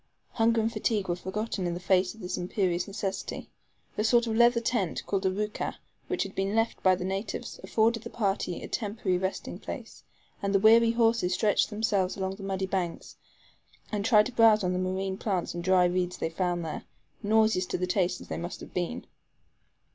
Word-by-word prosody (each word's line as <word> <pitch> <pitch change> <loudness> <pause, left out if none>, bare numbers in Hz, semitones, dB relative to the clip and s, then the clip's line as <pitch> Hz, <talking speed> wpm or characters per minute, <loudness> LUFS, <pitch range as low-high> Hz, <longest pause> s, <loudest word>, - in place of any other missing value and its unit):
Hunger 230 0 +2
and 225 +1 -1
fatigue 215 -3 -1
were 175 - +1
forgotten 190 +1 -3
in 170 - -2
the - - -5
face 185 +2 +2
of 225 - -14
this 180 - -3
imperious 180 0 -1
necessity. 195 -1 -4 0.5
A - - +2
sort 235 +1 +4
of 225 -1 -2
leather 235 +1 +5
tent, 230 -7 -1
called 195 -1 0
a - - +3
ROUKAH, 210 +3 -3 0.3
which 370 - 0
had 195 0 -8
been 195 +2 -1
left 225 0 0
by 185 -1 +5
the 180 0 -5
natives, 195 +2 -4
afforded 225 +4 +2
the - - -8
party 195 -5 -2
a - - -5
temporary 205 -4 -1
resting 190 +1 -4
place, - - -8 0.4
and 200 0 0
the - - +5
weary 230 +3 +6
horses 225 -6 +2
stretched 210 +1 +2
themselves 210 -4 0
along 190 0 -3
the - - -11
muddy 195 -1 -2
banks, 185 -3 -3 0.8
and 210 -2 -1
tried 215 -1 +5
to 255 - -4
browse 225 -3 +5
on 180 0 +1
the 180 - -1
marine 190 +1 -2
plants 190 -5 -1
and 175 - -5
dry 185 0 +4
reeds 180 0 0
they 160 - -2
found 175 0 -1
there 155 - -5 0.4
nauseous 215 -3 +3
to - - -2
the 180 - -1
taste 180 -1 0
as - - -11
they - - -4
must 175 +1 -5
have - - -11
been. 180 +7 -3
195 Hz, 200 wpm, -28 LUFS, 180-220 Hz, 0.8 s, weary